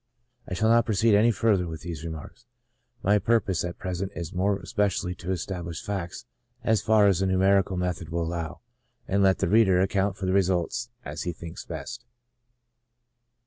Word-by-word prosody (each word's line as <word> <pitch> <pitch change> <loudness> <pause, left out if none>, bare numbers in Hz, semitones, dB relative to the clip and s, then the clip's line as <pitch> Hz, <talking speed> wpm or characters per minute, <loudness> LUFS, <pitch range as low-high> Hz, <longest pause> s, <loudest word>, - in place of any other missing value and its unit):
I 90 - -3
shall 110 +4 +2
not 115 0 +4
proceed 110 +1 +3
any 105 +3 +5
further 105 -5 +2
with 80 -1 -7
these 85 -3 -6
remarks; 85 +9 -8 0.6
my 105 +2 +4
purpose 100 -4 +1
at 85 0 -4
present 95 +1 -3
is 85 -2 -5
more 95 +2 +1
especially 95 -1 -1
to 90 0 -8
establish 85 -2 -4
facts 95 -4 -4 0.4
as 110 -1 +2
far 110 -2 +4
as 95 -3 +3
a 95 - +2
numerical 95 0 +3
method 90 -3 -2
will 85 +1 -1
allow, 80 -2 -4 0.5
and 100 +1 +1
let 95 -1 +4
the - - 0
reader 95 -2 +4
account 95 +1 +1
for 95 - -4
the 95 - +1
results 95 +4 +1 0.2
as 75 +2 -5
he 90 - -2
thinks 85 0 -9
best. - - -7
95 Hz, 175 wpm, -26 LUFS, 85-100 Hz, 0.6 s, any